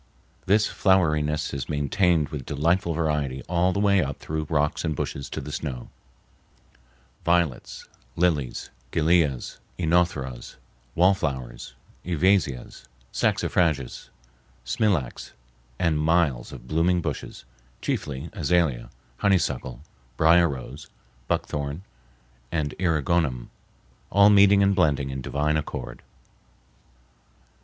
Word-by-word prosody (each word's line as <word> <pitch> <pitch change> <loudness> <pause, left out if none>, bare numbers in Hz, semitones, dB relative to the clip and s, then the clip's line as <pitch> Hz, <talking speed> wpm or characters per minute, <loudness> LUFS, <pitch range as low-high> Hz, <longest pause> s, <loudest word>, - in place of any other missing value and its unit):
This 105 +2 +4
floweriness 75 -6 +1
is 70 -3 -4
maintained 75 +2 +1
with 75 -5 -5
delightful 85 +5 0
variety 75 -5 -1
all 90 +1 +2
the 100 - -2
way 100 -2 +4
up 70 -1 -3
through 80 -1 -4
rocks 75 -1 0
and 80 -3 -1
bushes 70 0 -4
to - - -5
the 75 - -7
snow—violets, 65 +2 -5 0.3
lilies, 80 -8 0 0.2
gilias, 80 -5 +1 0.2
oenotheras, 80 -8 0 0.4
wallflowers, 70 -10 0 0.3
ivesias, 85 -8 0 0.3
saxifrages, 75 -8 0 0.6
smilax, 70 - -1 0.4
and 80 -2 +1
miles 75 -6 +1
of - - -11
blooming 85 +4 +2
bushes, - - -5 0.3
chiefly 70 +3 -3
azalea, 80 - 0 0.3
honeysuckle, 70 -10 0 0.4
brier 85 +1 +5
rose, 70 +1 -7 0.4
buckthorn, 75 +4 -2 0.7
and 75 -3 -1
eriogonum, 80 -6 0 0.6
all 100 +1 +6
meeting 100 0 +6
and 100 0 +3
blending 70 -7 +1
in 65 0 -5
divine 75 +4 0
accord. 75 - -5
75 Hz, 100 wpm, -25 LUFS, 70-90 Hz, 0.7 s, all